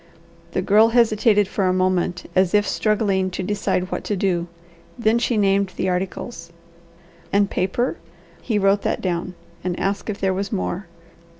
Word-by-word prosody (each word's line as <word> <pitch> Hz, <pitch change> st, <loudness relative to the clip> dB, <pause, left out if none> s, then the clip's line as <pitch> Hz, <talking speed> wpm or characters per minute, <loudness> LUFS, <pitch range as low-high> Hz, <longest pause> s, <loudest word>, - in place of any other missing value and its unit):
The 185 Hz, -, 0 dB
Girl 215 Hz, +4 st, +5 dB
hesitated 220 Hz, -3 st, +3 dB
for 195 Hz, -1 st, 0 dB
a 185 Hz, -, +2 dB
moment 185 Hz, -1 st, 0 dB
as 185 Hz, +1 st, +3 dB
if 205 Hz, -1 st, +3 dB
struggling 200 Hz, -4 st, +1 dB
to 185 Hz, +1 st, -4 dB
decide 190 Hz, -1 st, -1 dB
what -, -, -3 dB
to 205 Hz, -, -1 dB
do; 180 Hz, -3 st, 0 dB, 0.5 s
then 230 Hz, 0 st, +2 dB
she 240 Hz, -1 st, 0 dB
named 195 Hz, -1 st, +2 dB
the 185 Hz, -, -1 dB
articles. 180 Hz, -1 st, -4 dB, 0.8 s
"And 200 Hz, 0 st, +2 dB
paper?" 195 Hz, +8 st, -1 dB, 0.4 s
He 225 Hz, -4 st, -1 dB
wrote 200 Hz, 0 st, +3 dB
that -, -, -1 dB
down, 180 Hz, 0 st, -2 dB, 0.3 s
and 180 Hz, -1 st, -2 dB
asked 200 Hz, +2 st, -2 dB
if 205 Hz, -, -3 dB
there 190 Hz, -1 st, +1 dB
was 195 Hz, +2 st, -3 dB
more. 130 Hz, -, -3 dB
195 Hz, 165 wpm, -22 LUFS, 185-210 Hz, 0.8 s, Girl